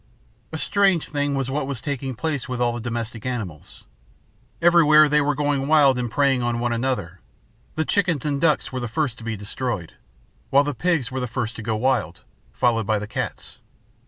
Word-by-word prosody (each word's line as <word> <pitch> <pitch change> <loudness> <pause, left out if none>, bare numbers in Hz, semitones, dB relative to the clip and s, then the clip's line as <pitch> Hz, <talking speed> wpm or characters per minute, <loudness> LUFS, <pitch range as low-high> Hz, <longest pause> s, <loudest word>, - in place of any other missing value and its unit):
"A 160 - -4
strange 195 -1 +2
thing 145 -1 -1
was 135 -1 -2
what 140 0 -1
was 140 -4 -4
taking 135 -2 -4
place 145 -1 -3
with 125 -1 -3
all 120 -1 +1
the 120 - -4
domestic 115 -1 -4
animals. 105 - -6 0.8
Everywhere 155 -3 +6
they 150 0 +3
were 145 -1 +1
going 145 -1 0
wild 145 -4 +5
and 120 -1 -2
preying 135 0 +2
on 120 -1 0
one 120 0 0
another. 115 -8 -2 0.6
The 160 - 0
chickens 175 -8 +1
and 140 -2 -1
ducks 155 -4 +2
were 130 - -3
the 120 - -3
first 125 0 -2
to - - -11
be 110 -1 -3
destroyed, 105 -3 -4 0.6
while 140 +1 +5
the 145 0 -2
pigs 155 -3 0
were 130 - -3
the 125 - -2
first 115 +1 -3
to - - -6
go 110 0 -1
wild, 115 -6 0 0.3
followed 115 -4 +1
by 110 - +2
the 105 - -4
cats. - - -5
130 Hz, 195 wpm, -23 LUFS, 115-145 Hz, 0.8 s, Everywhere